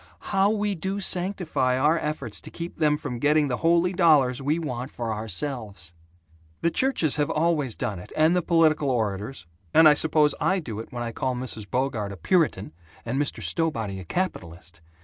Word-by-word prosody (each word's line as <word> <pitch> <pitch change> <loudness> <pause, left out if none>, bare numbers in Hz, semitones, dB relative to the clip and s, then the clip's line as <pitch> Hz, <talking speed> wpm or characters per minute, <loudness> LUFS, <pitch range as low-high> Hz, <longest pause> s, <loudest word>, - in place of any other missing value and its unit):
How 195 0 +3
we 210 -1 0
do 190 +3 -3
sanctify 180 -9 0
our 150 +5 +3
efforts 140 -8 -4
to - - -10
keep 170 0 -8
them 150 -2 +3
from 125 -5 -5
getting 150 +1 +3
the 125 - -1
holy 170 +2 +2
dollars 150 -8 +4
we 145 +4 0
want 130 -6 -4
for 115 -4 -4
ourselves! 105 - -5 0.7
The 170 - +2
churches 175 - +1
have 145 -1 +1
always 155 -6 +1
done 100 -4 -3
it, 90 - -12
and 160 +3 +4
the 180 - +2
political 160 -4 +3
orators 105 -3 -2 0.3
and 160 - +8
I 150 - +8
suppose 150 -1 +3
I 190 - +2
do 115 - -5
it 115 - -8
when 120 -1 -4
I 115 - -4
call 130 +2 -2
Mrs. 110 -5 -3
Bogart 120 -4 -1
a 100 - -8
'Puritan' 125 - +1 0.3
and 130 +5 -1
Mr. 145 - -2
Stowbody 115 - -1
a - - -7
'capitalist.' 85 - -5
145 Hz, 185 wpm, -25 LUFS, 115-165 Hz, 0.7 s, and